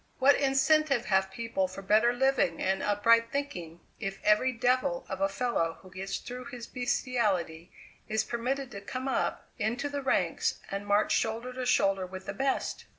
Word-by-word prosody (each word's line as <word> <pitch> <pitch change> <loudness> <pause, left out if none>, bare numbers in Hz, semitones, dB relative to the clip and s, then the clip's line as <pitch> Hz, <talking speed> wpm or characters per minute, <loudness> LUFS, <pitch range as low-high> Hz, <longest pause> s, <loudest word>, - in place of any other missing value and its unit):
What 270 +2 +6
incentive 275 -1 +3
have 190 -1 +2
people 230 -3 -2
for 190 +2 -9
better 215 +4 +4
living 250 -9 +1
and 190 0 0
upright 230 +3 +3
thinking 175 - -4 0.2
if 195 -2 -4
every 210 +5 +4
devil 245 -7 +1
of 190 0 -5
a 195 - +3
fellow 195 -6 -1
who 185 - -14
gets 195 +1 -4
through 250 +1 -8
his 245 -4 -7
beastiality 210 -10 -1 0.4
is 220 0 +1
permitted 255 +3 -3
to 200 - -7
come 255 +6 -5
up 265 - -1
into 240 +7 -1
the 285 0 -3
ranks 265 - 0
and 200 +1 -4
march 205 +1 +3
shoulder 230 +3 -1
to 255 0 -3
shoulder 195 -5 +2
with 185 +1 -9
the - - -4
best? 270 0 -1
230 Hz, 170 wpm, -29 LUFS, 195-255 Hz, 0.4 s, What